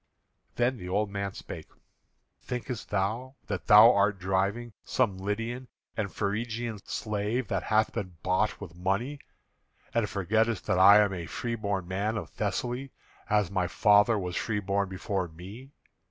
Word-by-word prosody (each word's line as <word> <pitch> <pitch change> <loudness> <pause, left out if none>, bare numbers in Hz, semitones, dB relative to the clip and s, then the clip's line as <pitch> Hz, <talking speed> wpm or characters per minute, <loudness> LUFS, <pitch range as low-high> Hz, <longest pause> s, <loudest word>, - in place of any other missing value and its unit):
Then 125 +1 +1
the 90 -4 -7
old 100 +2 0
man 100 -1 -3
spake: - - -8 0.7
"Thinkest 125 -2 -5
thou 110 +7 -1
that 100 -3 -4
thou 105 +3 +9
art 100 0 +2
driving 100 +5 -1
some 100 -7 0
Lydian 115 +6 -3 0.3
and 105 -3 -2
Phrygian 110 +2 -2
slave 105 +2 -2
that 95 - 0
hath 110 0 +1
been 95 -4 -5
bought 95 +4 +1
with 90 -5 -9
money, 100 +11 -1 0.7
and 115 -3 +1
forgettest 110 +2 0
that 90 - +1
I 100 +2 +9
am 100 -2 +1
a 85 -3 -5
freeborn 100 - -3
man 100 +4 -1
of - - -6
Thessaly, 120 +6 -2 0.4
as 105 -4 +2
my 95 -2 0
father 105 +5 +4
was 90 -3 -3
freeborn 100 -2 -1
before 95 -1 -2
me? 95 +11 -11
105 Hz, 145 wpm, -28 LUFS, 95-115 Hz, 0.7 s, thou